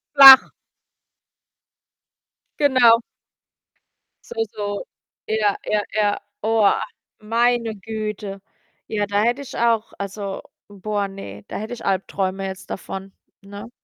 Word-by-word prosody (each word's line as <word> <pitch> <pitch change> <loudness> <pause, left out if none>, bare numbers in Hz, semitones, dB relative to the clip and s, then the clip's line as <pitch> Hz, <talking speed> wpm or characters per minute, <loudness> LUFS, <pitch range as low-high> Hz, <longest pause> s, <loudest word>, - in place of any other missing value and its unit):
Flach. 270 -1 +11 2.1
Genau. 250 -5 +5 1.3
So, 470 -2 -2
so. 205 -1 -3 0.4
Ja, 215 -2 +1 0.2
ja, 210 - +2
ja. 205 -1 +1 0.2
Oah, 220 -1 +2 0.4
meine 230 +1 0
Güte. 210 -1 -6 0.5
Ja, 210 -1 -1
da 205 0 +1
hätte 240 +4 0
ich 265 - -10
auch 230 -1 +1
also, 200 0 -5 0.3
boah, 205 0 -3
ne, 105 - -10
da - - -6
hätte 220 +3 -6
ich 240 - -9
Albträume 195 0 -2
jetzt 190 0 -9
davon, 195 0 -7 0.3
ne? 205 +3 -10
210 Hz, 110 wpm, -21 LUFS, 200-230 Hz, 2.1 s, Flach